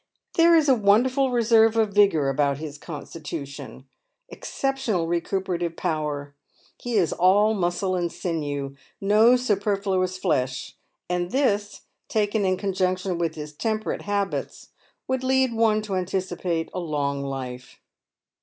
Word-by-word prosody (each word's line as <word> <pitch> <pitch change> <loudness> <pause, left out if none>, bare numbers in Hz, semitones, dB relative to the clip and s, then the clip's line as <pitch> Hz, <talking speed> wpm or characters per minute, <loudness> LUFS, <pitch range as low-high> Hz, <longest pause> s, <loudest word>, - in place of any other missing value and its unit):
There 335 0 +5
is 315 -2 +4
a 270 - +6
won 210 -1 +4
derful 260 +1 +1
reserve 225 -2 +4
of 215 -3 +2
vigour 195 -8 +4
about 140 0 +1
his 150 -1 -7
constitution, 145 -4 -8 0.4
exceptional 265 -10 -2
recuperative 175 0 -2
power; 150 -4 -3 0.5
he 245 -1 -4
is 185 -6 +2
all 205 +4 +4
muscle 185 0 -1
and 175 -2 -1
sinew 145 -6 -3
— - - -36 0.2
no 230 +3 +7
superfluous 200 -5 0
flesh; 130 -7 -1 0.3
and 180 0 -1
this, 210 -5 0 0.3
taken 210 -1 +1
in 185 0 +1
conjunction 185 -2 -1
with 170 -1 -1
his 150 -1 -7
temperate 215 +6 -2
habits, 200 -1 -3 0.4
would 260 0 -1
lead 260 -1 +2
one 220 -1 +2
to 205 -2 -5
anticipate 180 -2 -2
a - - -3
long 145 -4 -2
life. 130 -2 -6
185 Hz, 135 wpm, -24 LUFS, 160-215 Hz, 0.5 s, no